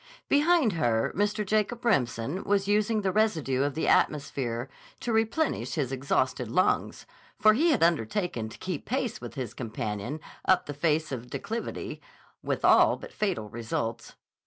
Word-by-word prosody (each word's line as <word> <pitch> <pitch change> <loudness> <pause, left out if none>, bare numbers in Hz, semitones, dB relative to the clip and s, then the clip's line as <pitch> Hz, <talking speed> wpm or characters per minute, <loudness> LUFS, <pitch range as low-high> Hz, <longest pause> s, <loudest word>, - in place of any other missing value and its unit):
Behind 295 - +4
her 120 -9 +1
Mr. 205 +2 0
Jacob 215 +4 0
Remsen 140 - 0
was 200 -1 +1
using 210 +1 +2
the 190 -2 0
residue 165 -12 +1
of 140 -1 0
the 160 - -1
atmosphere 135 -4 +1 0.3
to 235 - -2
replenish 225 +7 0
his 140 -5 -1
exhausted 130 -2 0
lungs, 185 +10 +1 0.3
for 215 0 +6
he 315 +10 +3
had 275 - +3
undertaken 165 - 0
to - - -11
keep 180 -6 -4
pace 250 -2 -2
with - - -8
his 130 -6 -4
companion 110 +3 -4 0.2
up 185 -1 +3
the 145 - -5
face 155 +1 0
of 130 -3 -3
the - - -18
declivity, 230 +2 -5 0.4
with - - -2
all - - +6
but - - -11
fatal 190 - -1
results. 115 +1 -4
165 Hz, 160 wpm, -28 LUFS, 125-215 Hz, 0.4 s, for